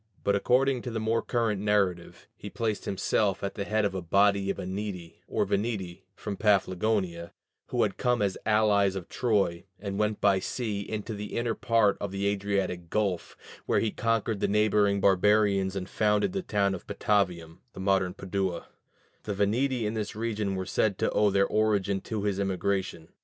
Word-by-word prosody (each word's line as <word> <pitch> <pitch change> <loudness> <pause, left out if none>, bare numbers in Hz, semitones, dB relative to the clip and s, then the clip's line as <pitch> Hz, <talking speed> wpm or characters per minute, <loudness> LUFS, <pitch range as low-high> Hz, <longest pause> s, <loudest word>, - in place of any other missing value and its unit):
But 100 - +2
according 130 +5 +2
to 125 - -5
the 115 -1 -3
more 110 +1 +1
current 115 -5 -1
narrative, 100 -4 0
he - - -8
placed 110 -3 -2
himself 100 0 0
at 100 - -2
the 100 - -4
head 110 0 +1
of 100 - -1
a 95 - -3
body 100 +3 +2
of - - -1
Eneti 95 -2 -5
or - - 0
Veneti 100 -4 -2
from 100 -2 -5
Paphlagonia, 95 -3 +1 0.3
who - - +1
had - - -1
come 125 -1 +1
as 100 -2 0
allies 105 -3 +3
of 95 -3 -6
Troy, 100 -8 0 0.2
and 100 0 -4
went 105 0 0
by 100 -2 +3
sea 105 0 -3
into 110 +2 -5
the 105 0 -5
inner 115 -1 0
part 110 -4 +2
of 100 - -2
the 100 +1 -2
Adriatic 100 -4 -1
Gulf, 100 -3 -1 0.3
where - - +3
he 110 - 0
conquered 115 -1 0
the - - +1
neighboring 105 -1 +2
barbarians 100 0 +3
and 95 -1 -4
founded 105 - +1
the 195 - -1
town 100 - 0
of 95 - -7
Patavium 90 -5 0
(the - - -10
modern 95 -2 +1
Padua); 95 -3 -3 0.6
the 105 - -3
Veneti 115 +5 +1
in 105 - -1
this 110 -2 -4
region 105 -3 -2
were 95 0 -3
said 100 +1 0
to - - 0
owe 105 -1 +3
their 100 0 +3
origin 100 -3 +1
to 110 -3 -4
his 100 -2 -1
immigration. 95 -3 -2
100 Hz, 180 wpm, -28 LUFS, 95-110 Hz, 0.6 s, allies